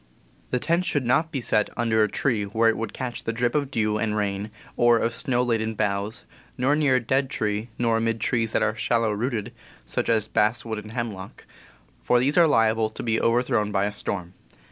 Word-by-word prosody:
The 125 - 0
tent 170 +7 0
should 145 -7 0
not 160 +7 +2
be 135 - -3
set 105 -2 +1
under 115 -2 +2
a 105 - +3
tree 115 -5 0
where 110 +3 +1
it 115 - +1
would 115 +1 -4
catch 125 -2 -5
the - - -1
drip 120 +1 0
of 145 -3 0
dew 110 -4 0
and 105 0 -1
rain 100 0 -2 0.3
or 120 -1 +4
of 115 0 0
snow 125 +1 0
laden 110 -2 -1
boughs, 100 +1 -2 0.3
nor 130 +4 +2
near 145 -4 +3
a - - +4
dead 130 +3 0
tree, 105 +1 -2
nor 115 -2 +2
amid 115 0 -1
trees 115 0 0
that - - +2
are 105 - 0
shallow 115 -1 +1
rooted 115 +1 -3 0.3
(such - - -2
as 110 -2 +2
basswood 110 +1 0
and 105 +1 -10
hemlock), 110 -6 -6 0.6
for 125 - +3
these 135 +4 +1
are 170 -2 +6
liable 110 -5 +2
to 110 - -8
be 115 -1 0
overthrown 115 -3 +1
by 100 -1 +1
a 105 - -1
storm. 90 -3 -5
115 Hz, 210 wpm, -25 LUFS, 105-125 Hz, 0.6 s, are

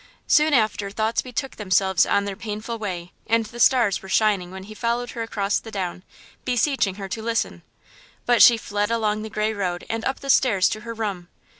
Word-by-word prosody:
Soon 305 +1 +4
after 215 -3 +1
thoughts 220 +3 0
betook 260 +2 -5
themselves 190 -2 +2
on 200 - +2
their 200 -1 -4
painful 220 +2 -5
way, 180 -4 -5 0.2
and 225 0 +2
the 235 +2 -10
stars 240 -6 +4
were 190 - -11
shining 200 -3 +2
when 190 +1 -9
he 215 +2 -10
followed 235 +2 -2
her 230 - -5
across 205 -3 -1
the 225 - -11
down, 185 -4 -4 0.4
beseeching 245 -5 +1
her 195 -1 -6
to 220 +4 -5
listen. 230 +1 -2 0.6
But 240 -1 +4
she 235 - +9
fled 205 -1 -2
along 215 -2 0
the 220 - -6
grey 215 +1 -1
road 180 -4 -3
and 225 0 -3
up 265 - -2
the 275 - +1
stairs 205 -9 +3
to 215 - -4
her 230 0 -7
room. 200 -6 -4
215 Hz, 200 wpm, -23 LUFS, 195-230 Hz, 0.6 s, she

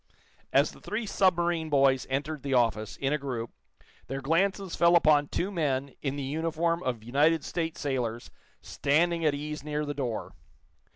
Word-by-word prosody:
As - - +3
the - - -16
three 220 +2 -3
submarine 175 -5 +1
boys 135 -2 +3
entered 145 +2 -2
the 135 -2 -1
office, 110 -3 +1
in 135 +1 0
a 150 - 0
group, 125 -5 -4 0.6
their 135 +1 -4
glances 185 +6 0
fell 170 0 +5
upon 150 -3 +5
two 185 +7 -2
men, 140 -6 -1
in 135 -1 -2
the 140 - -4
uniform 165 +4 -1
of 120 -7 -3
United 150 +7 +2
States 165 -1 -3
sailors, 120 -5 -2 0.3
standing 165 +4 +1
at 150 -2 +2
ease 150 +1 -5
near 150 0 -2
the 145 - -3
door. 125 -6 -4
150 Hz, 165 wpm, -28 LUFS, 135-165 Hz, 0.6 s, fell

